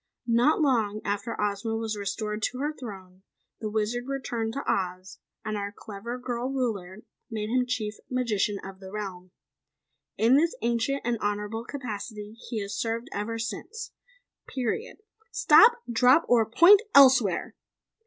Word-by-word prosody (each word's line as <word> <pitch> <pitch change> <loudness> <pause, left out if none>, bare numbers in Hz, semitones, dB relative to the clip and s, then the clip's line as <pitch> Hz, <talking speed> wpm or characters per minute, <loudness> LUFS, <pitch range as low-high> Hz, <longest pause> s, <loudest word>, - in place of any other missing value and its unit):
Not 240 +6 +3
long 225 -8 +2
after 205 +3 -3
Ozma 210 +2 -1
was 225 -1 -2
restored 210 +1 -3
to 250 - -10
her 295 +3 -2
throne, 190 -8 -10 0.4
the 215 - -3
Wizard 220 +4 -1
returned 240 -5 -3
to 280 - -4
Oz 185 0 -2 0.3
and 215 -1 -2
our 200 0 -3
clever 210 +4 -7
girl 245 0 -3
ruler 215 -7 -3 0.3
made 215 -1 -4
him 250 0 +2
Chief 220 -4 -3
Magician 215 -5 0
of 190 0 -9
the 190 -1 -10
realm. 190 -3 -6 0.9
In 235 +5 +5
this 330 +3 +2
ancient 240 +4 0
and 235 -1 0
honorable 210 +2 -2
capacity 215 -5 -6 0.2
he 225 -4 -2
has 200 0 -5
served 230 +2 -2
ever 215 +3 -3
since, 440 - -5 0.6
PERIOD 275 - -3 0.3
STOP 460 +3 +7 0.2
DROP 250 +7 +5
OR 230 -3 +4
POINT 370 - +7
ELSEWHERE!" 255 -9 +6
225 Hz, 145 wpm, -27 LUFS, 205-250 Hz, 0.9 s, STOP